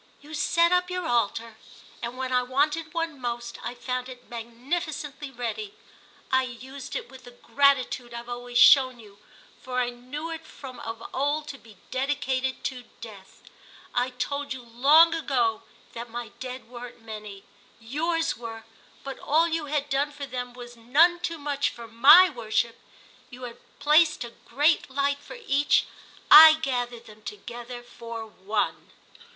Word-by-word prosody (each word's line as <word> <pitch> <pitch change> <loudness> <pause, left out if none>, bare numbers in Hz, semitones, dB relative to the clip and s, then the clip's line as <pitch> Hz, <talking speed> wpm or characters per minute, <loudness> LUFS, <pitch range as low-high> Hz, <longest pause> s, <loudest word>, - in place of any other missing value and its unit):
"You 300 +2 -13
set 335 +3 +3
up 360 0 +2
your 360 -1 -3
altar, 230 -3 -1 0.4
and 240 +1 -5
when 260 0 -3
I 250 - +4
wanted 295 +5 0
one 325 -4 -3
most 240 -1 -4
I 245 - -5
found 250 +1 -4
it 250 -1 -12
magnificently 275 +5 -4
ready. 270 - -5 0.6
I 260 0 +4
used 260 +2 -8
it - - -4
with 260 0 -14
the - - -10
gratitude 255 -1 +2
I've 235 0 -7
always 245 0 -4
shown 255 -1 +7
you, 205 -2 -16 0.4
for 255 0 -5
I 245 -1 0
knew 270 +7 -7
it 325 0 -6
from 265 -5 -11
of 225 0 -7
old 290 +3 -1
to 275 - -8
be 220 -4 -17
dedicated 265 -1 -1
to 250 -3 -4
Death. 205 -4 -12 0.5
I 245 +1 +1
told 280 +3 -3
you 255 -2 -9
long 285 +8 +5
ago 245 -9 0 0.3
that 235 +1 -7
my 235 0 -6
Dead 255 -2 -7
weren't 240 -1 -10
many. 210 -3 -9 0.4
Yours 325 +8 -1
were, 225 -1 -8 0.4
but 270 -1 -7
all 320 +3 +2
you 325 -2 -2
had 290 0 -1
done 285 +1 0
for 285 -1 -7
them 250 -2 -5
was 240 -1 -10
none 300 +10 +4
too 335 -1 -3
much 285 -1 -1
for 235 -1 -10
my 270 +11 +8
worship! 230 -4 -2 0.5
You 250 0 -11
had 240 -1 -8 0.2
placed 305 -1 +4
a 235 - -8
great 290 +8 +1
light 280 +1 0
for 385 - -11
Each—I 300 +2 +6
gathered 245 -6 -3
them 215 -1 -15
together 240 - -8
for 230 -1 -8
One!" 210 0 -3
255 Hz, 155 wpm, -26 LUFS, 235-290 Hz, 0.6 s, my